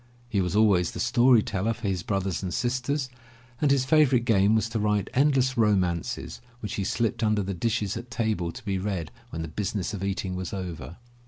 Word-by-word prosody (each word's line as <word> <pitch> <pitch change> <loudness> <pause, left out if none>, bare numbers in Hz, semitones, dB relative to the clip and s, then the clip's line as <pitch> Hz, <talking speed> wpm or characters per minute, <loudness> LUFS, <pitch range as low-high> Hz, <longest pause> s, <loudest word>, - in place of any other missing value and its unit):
He 105 -5 0
was 90 +1 -1
always 100 -5 +4
the - - -7
story 120 -1 +4
teller 110 -1 -1
for 110 - -5
his 95 -2 -1
brothers 95 -1 -2
and 95 -2 -3
sisters, 130 +5 -1 0.5
and 150 - +3
his 135 -2 +3
favorite 130 -4 +4
game 105 -1 +4
was 110 +1 +1
to 115 0 -2
write 105 -1 0
endless 135 -2 +3
romances 95 -6 0 0.2
which 105 - -5
he 100 - -2
slipped 115 +4 -1
under 105 -2 +2
the 100 +1 -3
dishes 105 0 -1
at 120 - -7
table 110 -8 -1
to 110 - -11
be 95 -2 -1
read 95 -5 -3 0.2
when 80 0 -5
the - - -4
business 100 +4 -3
of 100 -2 -4
eating 95 -1 -2
was 90 -1 -5
over. 85 -4 -6
105 Hz, 200 wpm, -26 LUFS, 95-120 Hz, 0.5 s, always